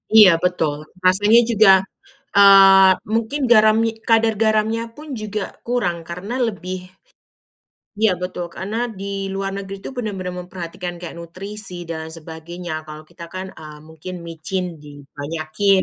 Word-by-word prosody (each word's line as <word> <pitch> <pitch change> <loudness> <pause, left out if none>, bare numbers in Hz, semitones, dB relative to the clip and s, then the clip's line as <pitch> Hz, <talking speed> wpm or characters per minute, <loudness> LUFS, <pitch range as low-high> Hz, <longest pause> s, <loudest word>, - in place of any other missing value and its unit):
Iya 210 -3 +10
betul. 160 -5 +1 0.3
Rasanya 205 +5 +5
juga 220 -3 +5 0.7
eee, 195 -1 +8 0.2
mungkin 230 +6 -1
garami 220 0 +5 0.2
kadar 225 0 +4
garamnya 220 +1 +1
pun 305 +1 -11
juga 210 -1 -3 0.3
kurang 220 -9 0
karena 185 +7 -6
lebih 185 -3 -5 1.2
iya 220 -3 +5
betul 180 -1 -4
karena 200 +5 -4 0.2
di 200 - -5 0.3
luar 195 0 -3
negeri 195 0 -6
tuh - - -5
benar-benar 190 -6 -4
memperhatikan 180 0 -7
kayak 170 -1 -8
nutrisi 195 +3 -8
dan 165 -1 -5
lain 160 0 -8
sebagainya, 165 +2 -8
kalau 155 0 -9
kita 170 0 -10
kan, 185 0 -5
ah, 155 -1 -10
mungkin 160 +3 -9
micin 165 +3 -4 0.2
di 150 - -12 0.3
banyakin. 160 +6 +1
190 Hz, 135 wpm, -20 LUFS, 170-215 Hz, 1.2 s, Iya